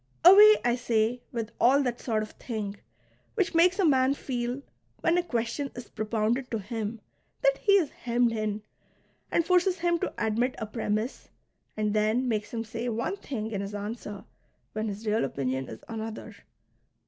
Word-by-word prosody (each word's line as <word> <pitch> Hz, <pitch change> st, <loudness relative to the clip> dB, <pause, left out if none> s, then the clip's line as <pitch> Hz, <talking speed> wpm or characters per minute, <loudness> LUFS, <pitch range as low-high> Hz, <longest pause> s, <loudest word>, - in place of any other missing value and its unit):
Away, 415 Hz, +4 st, +10 dB
I 240 Hz, 0 st, +3 dB
say, 235 Hz, 0 st, +1 dB
with 230 Hz, -1 st, -4 dB
all 275 Hz, +4 st, +5 dB
that 245 Hz, -2 st, -2 dB
sort 220 Hz, -3 st, -1 dB
of 215 Hz, -, -8 dB
thing, 210 Hz, -4 st, -5 dB, 0.6 s
which 390 Hz, -5 st, +1 dB
makes 350 Hz, +3 st, +5 dB
a 390 Hz, -, +3 dB
man 265 Hz, -2 st, +4 dB
feel, 250 Hz, 0 st, -3 dB, 0.4 s
when 330 Hz, 0 st, +3 dB
a 355 Hz, -, +3 dB
question 245 Hz, -2 st, -2 dB
is 245 Hz, -1 st, -8 dB
propounded 225 Hz, +4 st, -1 dB
to 225 Hz, -, -1 dB
him, 220 Hz, +1 st, -4 dB, 0.4 s
that -, -, +3 dB
he 405 Hz, -, +3 dB
is 360 Hz, -8 st, +4 dB
hemmed 240 Hz, 0 st, +1 dB
in, 215 Hz, -1 st, -2 dB, 0.7 s
and 335 Hz, -, +2 dB
forces 365 Hz, +1 st, +3 dB
him 345 Hz, 0 st, +1 dB
to -, -, -2 dB
admit 230 Hz, +3 st, 0 dB
a 220 Hz, -, -3 dB
premiss, 215 Hz, +2 st, -3 dB, 0.5 s
and 210 Hz, -1 st, 0 dB
then 215 Hz, +4 st, +2 dB
makes 215 Hz, -3 st, -1 dB
him 225 Hz, -1 st, -3 dB
say 230 Hz, +2 st, -4 dB
one 235 Hz, -, -2 dB
thing 225 Hz, -, -5 dB
in 200 Hz, -2 st, -2 dB
his 200 Hz, +1 st, -5 dB
answer 205 Hz, -1 st, -6 dB, 0.5 s
when 215 Hz, +1 st, -2 dB
his 210 Hz, +2 st, -5 dB
real 215 Hz, +1 st, +1 dB
opinion 130 Hz, -1 st, -2 dB
is 110 Hz, -, -9 dB
another. 225 Hz, -1 st, -6 dB
230 Hz, 170 wpm, -28 LUFS, 215-270 Hz, 0.7 s, Away